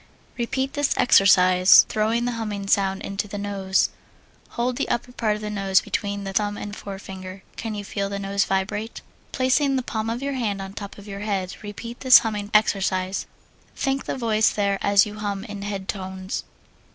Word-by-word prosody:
Repeat 265 Hz, +3 st, -2 dB
this 290 Hz, -1 st, +1 dB
exercise, 185 Hz, -4 st, +6 dB
throwing 225 Hz, +2 st, 0 dB
the 245 Hz, -, 0 dB
humming 210 Hz, -4 st, -4 dB
sound 195 Hz, -1 st, +1 dB
into 200 Hz, +1 st, -3 dB
the 205 Hz, 0 st, -6 dB
nose. 195 Hz, -2 st, 0 dB, 0.7 s
Hold 245 Hz, +1 st, 0 dB
the -, -, -1 dB
upper 240 Hz, +1 st, -2 dB
part 220 Hz, -4 st, 0 dB
of 210 Hz, -, -8 dB
the 210 Hz, -, -3 dB
nose 195 Hz, -2 st, +3 dB
between 200 Hz, -1 st, -3 dB
the 195 Hz, 0 st, -5 dB
thumb 205 Hz, 0 st, 0 dB
and 205 Hz, 0 st, -6 dB
forefinger. 190 Hz, -1 st, -8 dB
Can 225 Hz, -2 st, -4 dB
you 205 Hz, -1 st, -5 dB
feel 200 Hz, 0 st, -3 dB
the 200 Hz, -, -3 dB
nose 200 Hz, 0 st, 0 dB
vibrate? 205 Hz, +3 st, -2 dB, 0.3 s
Placing 270 Hz, +2 st, +2 dB
the 260 Hz, -, 0 dB
palm 220 Hz, -1 st, -3 dB
of 235 Hz, +3 st, -3 dB
your 280 Hz, 0 st, -1 dB
hand 220 Hz, -6 st, -2 dB
on 195 Hz, 0 st, -7 dB
top 200 Hz, -1 st, -8 dB
of 200 Hz, 0 st, -12 dB
your 200 Hz, -1 st, -6 dB
head, 195 Hz, -3 st, -2 dB
repeat 225 Hz, +3 st, -8 dB
this 260 Hz, -2 st, +9 dB
humming 210 Hz, -2 st, -3 dB
exercise. 190 Hz, -3 st, +1 dB, 0.5 s
Think 270 Hz, 0 st, -1 dB
the -, -, -3 dB
voice 220 Hz, -3 st, +3 dB
there 200 Hz, -1 st, 0 dB
as 200 Hz, 0 st, +5 dB
you 210 Hz, 0 st, -8 dB
hum 200 Hz, -2 st, -3 dB
in 205 Hz, -3 st, -7 dB
head 200 Hz, -1 st, -4 dB
tones. 190 Hz, -1 st, -4 dB
205 Hz, 190 wpm, -24 LUFS, 195-225 Hz, 0.7 s, this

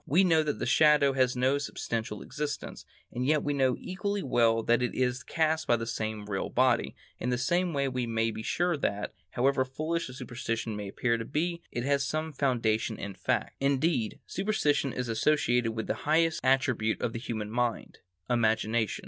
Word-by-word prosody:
We 175 Hz, +8 st, +4 dB
know 165 Hz, -4 st, +4 dB
that 150 Hz, -1 st, -2 dB
the -, -, -3 dB
shadow 150 Hz, -3 st, +5 dB
has 130 Hz, -1 st, +2 dB
no 130 Hz, +3 st, +2 dB
substantial 115 Hz, -6 st, -4 dB
existence, 150 Hz, +1 st, -5 dB, 0.3 s
and 125 Hz, -, -3 dB
yet 150 Hz, +3 st, +2 dB
we 145 Hz, -, 0 dB
know 130 Hz, -3 st, +2 dB
equally 200 Hz, +2 st, -3 dB
well 115 Hz, -3 st, +3 dB
that 120 Hz, +2 st, +3 dB
it 125 Hz, -, -1 dB
is 125 Hz, 0 st, 0 dB
cast 160 Hz, +6 st, 0 dB
by 120 Hz, -, +4 dB
some 110 Hz, -2 st, -3 dB
real 100 Hz, -2 st, -3 dB
body; 120 Hz, -, +2 dB, 0.2 s
in 125 Hz, -, -2 dB
the 125 Hz, -, +1 dB
same 175 Hz, +8 st, +1 dB
way 140 Hz, -2 st, 0 dB
we 125 Hz, -2 st, -2 dB
may 115 Hz, 0 st, 0 dB
be 110 Hz, -, -6 dB
sure 175 Hz, +9 st, 0 dB
that, 105 Hz, -6 st, -2 dB, 0.2 s
however 130 Hz, +4 st, +2 dB
foolish 155 Hz, +5 st, -3 dB
a -, -, -9 dB
superstition 115 Hz, -3 st, -4 dB
may 105 Hz, -1 st, -5 dB
appear 115 Hz, +4 st, 0 dB
to 115 Hz, -, -4 dB
be, 170 Hz, +5 st, -2 dB
it 120 Hz, -, -3 dB
has 140 Hz, +1 st, +2 dB
some 155 Hz, +3 st, -2 dB
foundation 115 Hz, -5 st, 0 dB
in 100 Hz, 0 st, -5 dB
fact. -, -, -1 dB
Indeed, 140 Hz, -3 st, +1 dB
superstition 185 Hz, -9 st, 0 dB
is 125 Hz, 0 st, -3 dB
associated 120 Hz, -1 st, +2 dB
with 110 Hz, 0 st, -3 dB
the -, -, -1 dB
highest 160 Hz, +1 st, +2 dB
attribute 130 Hz, -4 st, +2 dB
of 115 Hz, -, -2 dB
the 115 Hz, -, -4 dB
human 110 Hz, -3 st, -4 dB
mind,—imagination. 110 Hz, 0 st, -1 dB
125 Hz, 180 wpm, -29 LUFS, 115-150 Hz, 0.3 s, shadow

